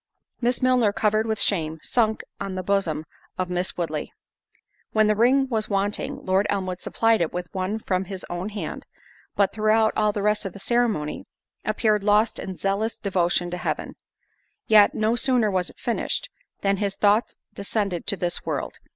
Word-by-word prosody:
Miss 245 +1 0
Milner, 250 -4 +4
covered 215 +1 +1
with 220 -1 -1
shame, 160 -5 +1
sunk 220 -3 +1 0.2
on 195 -1 -4
the 185 - -3
bosom 180 -5 0 0.3
of 185 -1 -2
Miss 180 +1 -1
Woodley. 155 -4 -3 0.8
When 215 0 +4
the 215 - +4
ring 255 +5 +3
was 220 -4 -1
wanting, 210 +8 -2
Lord 190 +2 +2
Elmwood 185 -2 -2
supplied 225 -2 +2
it 165 - 0
with 180 0 -5
one 190 +3 -1
from 190 -3 -1
his 190 0 -6
own 175 +3 -4
hand, 210 -1 -6 0.5
but 200 -1 +2
throughout 220 +1 +3
all 210 -1 +3
the 205 -1 -3
rest 210 +1 +2
of 195 -4 -5
the 200 - -10
ceremony, 220 -10 0 0.4
appeared 215 -1 +1
lost 210 +2 +3
in 190 - -5
zealous 200 +5 -1
devotion 175 -4 0
to 180 - -3
Heaven. - - -3 0.7
Yet, 210 -2 +6
no 220 +2 +2
sooner 240 -4 +2
was 185 -2 0
it - - -16
finished, 245 - -2 0.3
than 195 0 +2
his 200 0 -1
thoughts 210 +3 +2 0.2
descended 200 -3 -2
to 200 - 0
this 175 -1 -2
world. - - -4
205 Hz, 175 wpm, -24 LUFS, 185-220 Hz, 0.8 s, Yet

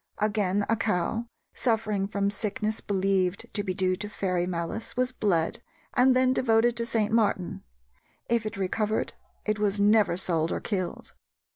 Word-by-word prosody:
Again, 205 -2 +1
a 225 - +3
cow, 220 +3 -1 0.3
suffering 215 -5 0
from 200 0 0
sickness 215 +1 -2
believed 195 -1 0
to 205 - -1
be 185 -2 -2
due 185 -1 +2
to 210 +2 -5
fairy 180 -4 -1
malice, 175 +7 -4
was 255 0 +1
bled 195 -5 0 0.3
and 255 +1 +5
then 255 0 +4
devoted 235 -1 +3
to 235 0 -1
St. 215 -3 +1
Martin. 210 -5 +1 0.7
If 235 -1 +2
it 215 - -6
recovered, 210 +3 -1 0.3
it 215 0 0
was 205 -1 +1
never 205 -3 +4
sold 165 -3 0
or - - -1
killed. 185 -5 -4
210 Hz, 155 wpm, -27 LUFS, 190-225 Hz, 0.7 s, and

